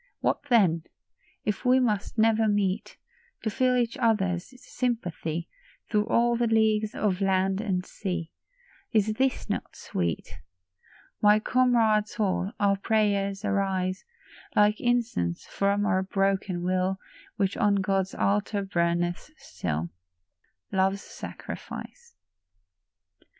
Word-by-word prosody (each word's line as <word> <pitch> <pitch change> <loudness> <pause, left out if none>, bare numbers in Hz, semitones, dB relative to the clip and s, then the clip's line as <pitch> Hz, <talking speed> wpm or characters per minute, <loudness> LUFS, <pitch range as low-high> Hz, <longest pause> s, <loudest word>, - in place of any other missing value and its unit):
What - - 0
then? 175 -9 +4 0.6
If 210 +2 -1
we 255 0 +5
must 215 -4 -1
never 225 0 +4
meet 205 -1 0 0.2
— 475 0 -35
To 220 - -1
feel 255 +2 +2
each 240 -2 0
other's 195 -5 +1
sympathy 175 -12 -3 0.4
Through 210 0 +2
all 235 0 +3
the 235 0 +1
leagues 220 -1 +2
of 200 -2 0
land 190 0 +2
and 185 -4 -1
sea, 180 -4 -4 0.6
Is 215 -1 +2
this 260 +3 0
not - - -4
sweet? 85 -3 -3 0.8
My 210 0 +6
comrade 225 -3 +3
soul, 195 -2 -1
our 200 -1 +3
prayers 200 -1 0
arise 190 -2 0 0.5
Like 210 +1 +4
incense 235 - 0
from 200 +1 0
our 190 -3 +2
broken 195 -2 0
will, 185 +1 0 0.4
Which 195 -3 0
on 205 -1 +3
God's 195 -1 0
altar 205 0 0
burneth 175 - -1
still, 80 0 -4 0.8
Love's 195 +1 +1
sacrifice. 475 -1 -8
200 Hz, 115 wpm, -27 LUFS, 190-220 Hz, 0.8 s, My